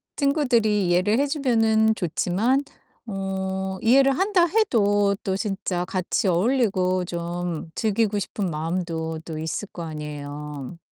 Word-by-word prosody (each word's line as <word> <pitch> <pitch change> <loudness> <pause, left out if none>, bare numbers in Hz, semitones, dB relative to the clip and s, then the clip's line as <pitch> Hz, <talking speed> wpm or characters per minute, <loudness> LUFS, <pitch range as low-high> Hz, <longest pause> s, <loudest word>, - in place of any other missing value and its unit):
친구들이 240 - +2
이해를 185 +6 +2
해 285 - +2
주면은 225 -6 +2
좋지만 210 - 0 0.4
어 190 -2 -3
이해를 270 +3 +4
한다 380 -3 +3
해도 205 - +2
또 190 -2 0
진짜 195 -3 -2
같이 185 +1 -1
어울리고 185 -2 +2
좀 170 -1 -4
즐기고 215 -1 +1
싶은 200 0 -3
마음도 165 0 -3
또 160 -2 -6
있을 160 +6 -3
거 170 - -6
아니에요. 150 -1 -6
195 Hz, 265 characters per minute, -24 LUFS, 175-225 Hz, 0.4 s, 이해를